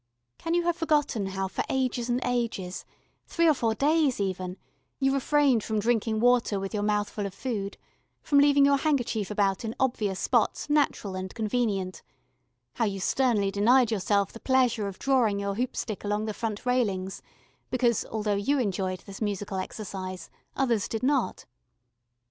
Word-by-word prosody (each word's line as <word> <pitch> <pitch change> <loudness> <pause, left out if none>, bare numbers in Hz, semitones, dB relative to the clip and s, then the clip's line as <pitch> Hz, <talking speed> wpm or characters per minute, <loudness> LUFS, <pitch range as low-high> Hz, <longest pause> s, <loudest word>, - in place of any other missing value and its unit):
Can 330 +1 -1
you 345 - +2
have 345 0 +1
forgotten 295 - +1
how 195 0 -2
for - - -3
ages 255 -2 -1
and 240 +1 +1
ages 230 -7 -2 0.4
three 335 -1 +2
or 315 - +6
four 225 -5 0
days, 295 -3 +2
even 185 -1 -3 0.4
you 270 -1 +2
refrained 275 -4 +3
from 220 - -2
drinking 220 0 +1
water 240 -3 +3
with 195 +2 -5
your 210 - -1
mouth 210 0 +1
full 205 -2 -4
of 195 - -10
food, 205 -5 -4 0.5
from 285 - +4
leaving 285 0 +5
your 280 0 +4
handkerchief 250 -8 0
about 200 -1 0
in 225 0 -4
obvious 215 -7 0
spots 295 - +1
natural 280 -9 +1
and 185 0 -5
convenient, 210 -4 -1 0.7
how 230 - 0
you 195 -2 -2
sternly 210 -2 +1
denied 235 +4 +4
yourself 200 -1 +1
the 230 - -9
pleasure 250 -5 +2
of 195 - -7
drawing 240 -7 +2
your 200 0 -2
hoop 245 +5 -2
stick 215 -4 -4
along 210 +1 -1
the 215 - -3
front 220 +1 -4
railings 200 -7 0 0.5
because, 240 -3 +1
though 215 -1 0
you 205 +9 +1
enjoyed 190 -5 -1
this 195 +1 -11
musical 205 -2 -2
exercise, 185 -2 -6 0.2
others 240 -7 +1
did 225 +2 -4
not? 265 -7 0
220 Hz, 165 wpm, -27 LUFS, 200-255 Hz, 0.7 s, or